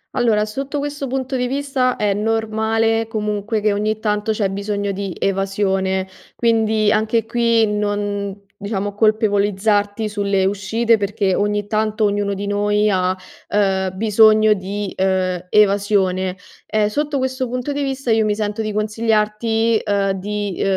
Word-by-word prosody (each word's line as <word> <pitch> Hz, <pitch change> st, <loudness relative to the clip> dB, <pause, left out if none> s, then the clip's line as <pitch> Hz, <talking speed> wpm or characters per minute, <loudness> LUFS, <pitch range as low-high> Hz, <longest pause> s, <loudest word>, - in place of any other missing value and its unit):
Allora, 225 Hz, -4 st, +2 dB
sotto 275 Hz, +7 st, -4 dB
questo 285 Hz, -1 st, -3 dB
punto 260 Hz, +1 st, -3 dB
di 250 Hz, -1 st, 0 dB
vista 270 Hz, -2 st, 0 dB
è 205 Hz, -1 st, 0 dB
normale 225 Hz, +1 st, 0 dB
comunque 210 Hz, 0 st, -2 dB
che 210 Hz, -1 st, +2 dB
ogni 215 Hz, +1 st, -1 dB
tanto 210 Hz, 0 st, -1 dB
c'è 205 Hz, -3 st, 0 dB
bisogno 200 Hz, 0 st, -2 dB
di 195 Hz, -2 st, -4 dB
evasione, 190 Hz, -1 st, 0 dB, 0.3 s
quindi 220 Hz, -2 st, +2 dB
anche 220 Hz, +1 st, +1 dB
qui 230 Hz, -1 st, +2 dB
non 205 Hz, -1 st, -2 dB, 0.2 s
diciamo 205 Hz, -1 st, -2 dB
colpevolizzarti 205 Hz, 0 st, +1 dB
sulle 200 Hz, -2 st, 0 dB
uscite 215 Hz, +4 st, +1 dB
perché 200 Hz, -2 st, 0 dB
ogni 205 Hz, 0 st, 0 dB
tanto 215 Hz, 0 st, 0 dB
ognuno 205 Hz, 0 st, 0 dB
di 200 Hz, +1 st, -4 dB
noi 205 Hz, +1 st, +1 dB
ha, 185 Hz, -2 st, +1 dB, 0.4 s
ehm, 190 Hz, -2 st, +1 dB
bisogno 215 Hz, 0 st, +5 dB
di, 200 Hz, 0 st, -4 dB
ehm, 185 Hz, -1 st, 0 dB
evasione. 195 Hz, -3 st, +2 dB, 0.3 s
Ehm, 215 Hz, -1 st, +1 dB
sotto 290 Hz, +6 st, -1 dB
questo 260 Hz, -1 st, -2 dB
punto 250 Hz, +3 st, -3 dB
di 285 Hz, -, -2 dB
vista 270 Hz, -2 st, -3 dB
io 220 Hz, 0 st, +3 dB
mi 210 Hz, -, +1 dB
sento 210 Hz, +1 st, -2 dB
di 215 Hz, -1 st, -2 dB
consigliarti, 220 Hz, +1 st, +1 dB
ehm, 200 Hz, -1 st, +1 dB
di 205 Hz, 0 st, -3 dB
210 Hz, 140 wpm, -19 LUFS, 200-225 Hz, 0.4 s, bisogno